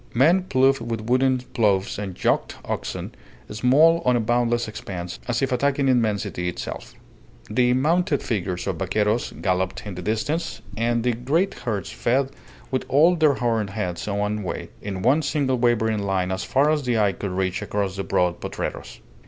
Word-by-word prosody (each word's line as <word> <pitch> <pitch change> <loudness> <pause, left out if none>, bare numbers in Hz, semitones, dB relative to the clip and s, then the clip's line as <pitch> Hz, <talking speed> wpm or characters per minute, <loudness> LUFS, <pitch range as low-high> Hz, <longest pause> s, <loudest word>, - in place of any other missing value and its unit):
Men 170 +9 +4
ploughed 135 -3 +3
with 115 -1 -3
wooden 130 +3 +2 0.2
ploughs 100 -4 +1
and 95 -3 -5
yoked - - +1
oxen, - - -4 0.4
small 145 +10 +4
on 125 -1 +3
a - - +2
boundless 120 +1 +1
expanse, 90 -4 -6
as 120 +2 0
if 135 - 0
attacking 140 +2 +1
immensity 105 -7 +1
itself. 90 - -7 0.6
The 125 -1 +3
mounted 155 +3 +1
figures 95 -5 -2
of 95 -4 -2
vaqueros 105 +5 0
galloped 95 0 -2
in 100 - -5
the 90 - -6
distance, 110 - -2
and 115 0 0
the 125 0 +2
great 150 - 0
herds 105 -8 -4
fed 130 +3 0 0.4
with 130 - 0
all 160 +6 +5
their 155 -4 +3
horned 115 -4 0
heads 95 -4 -4
one 105 +1 -1
way, 95 - -5
in 95 -2 -5
one 135 +7 +4
single 140 -4 0
wavering 110 -3 +2
line 95 -2 -1
as 95 0 -2
far 140 +7 +2
as 145 -5 -1
eye 110 -4 +3
could 100 +1 -5
reach 95 0 -1
across 100 -2 -2
the 95 - -3
broad 90 -2 +1
potreros. - - -5
115 Hz, 170 wpm, -23 LUFS, 100-130 Hz, 0.6 s, all